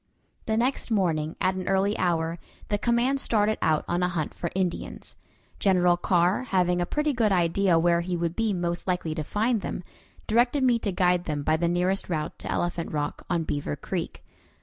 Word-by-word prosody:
The 220 0 +1
next 250 +3 0
morning, 165 -7 0
at 185 0 +2
an 185 -1 -5
early 195 +2 +2
hour, 165 -1 0 0.3
the 205 -1 0
command 240 +4 +2
started 215 -3 +2
out 155 -1 +2
on 175 +1 0
a 180 - +2
hunt 170 -4 -3
for 170 - -4
Indians. 185 -2 -3 0.4
General 180 -3 +4
Carr, 175 +6 +1
having 180 -5 +1
a 175 - -1
pretty 300 +4 0
good 225 -4 +2
idea 175 0 +3
where 170 +1 +3
he 175 0 -2
would 170 0 -2
be 225 -1 +1
most 175 -2 -2
likely 180 -3 -1
to 155 -1 -3
find 220 +6 0
them, 180 - -4 0.4
directed 240 +5 +2
me 245 -2 +3
to 205 - -1
guide 180 -1 +2
them 150 -2 -2
by 155 +2 +2
the 170 +2 0
nearest 180 +3 0
route 155 -2 -3
to - - -4
Elephant 175 -1 -2
Rock 145 -1 -3
on 170 -2 +1
Beaver 145 - -3
Creek. - - -5
180 Hz, 195 wpm, -26 LUFS, 170-210 Hz, 0.4 s, General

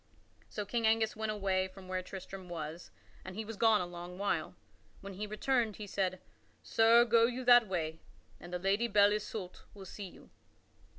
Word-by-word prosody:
So 210 - -4
King 230 +2 0
Angus 220 0 +2
went 220 0 -2
away 190 -2 0
from 190 0 -13
where 185 0 -2
Sir - - -18
Tristram 190 -1 -8
was, 165 0 -6 0.3
and 185 0 -8
he 220 +1 -4
was 225 +1 -6
gone 220 -1 +4
a - - -2
long 175 +1 -8
while. 200 +1 -1 0.5
When 195 0 -8
he 210 +3 -5
returned 225 0 0
he 210 - -7
said: 185 -2 -1 0.4
"Sir, 230 +1 +5
go 230 0 +5
you 250 +1 -4
that 240 -2 +7
way 160 -4 -3 0.4
and 175 - -11
the 180 - -1
Lady 195 +6 +1
Belle 205 -2 +5
Isoult 210 -3 -5
will 195 -1 -10
see 195 +1 -7
you." - - -16
200 Hz, 190 wpm, -33 LUFS, 185-220 Hz, 0.5 s, that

